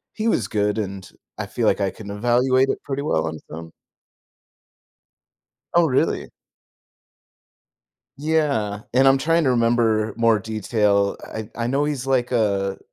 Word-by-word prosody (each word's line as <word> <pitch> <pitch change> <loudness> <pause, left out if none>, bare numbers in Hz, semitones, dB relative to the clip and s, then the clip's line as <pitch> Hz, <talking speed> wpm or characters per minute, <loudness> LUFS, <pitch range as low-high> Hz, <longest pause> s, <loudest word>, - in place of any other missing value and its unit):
he 220 +1 -2
was - - 0
good, 105 0 0
and 100 -2 -5 0.3
I - - -3
feel - - -2
like - - +2
I 95 - +1
can 100 -2 -9
evaluate 125 +5 +2
it - - 0
pretty 140 0 -3
well 80 - 0
on 80 -1 -5
some 80 +1 -9 2.0
Oh, 170 -1 +5
really? 130 - 0 1.9
Yeah, 140 -10 0
and, 130 +2 +5
I'm 135 - +5
trying 165 +4 +2
to 130 - +3
remember 115 -3 +2
more 115 -2 +3
detail, 105 -1 0 0.2
I 110 -1 -5
I 115 0 -2
know 140 +4 +1
he's 140 -3 -3
like 130 -2 +1
a 100 -5 0
115 Hz, 145 wpm, -22 LUFS, 105-135 Hz, 2.0 s, Oh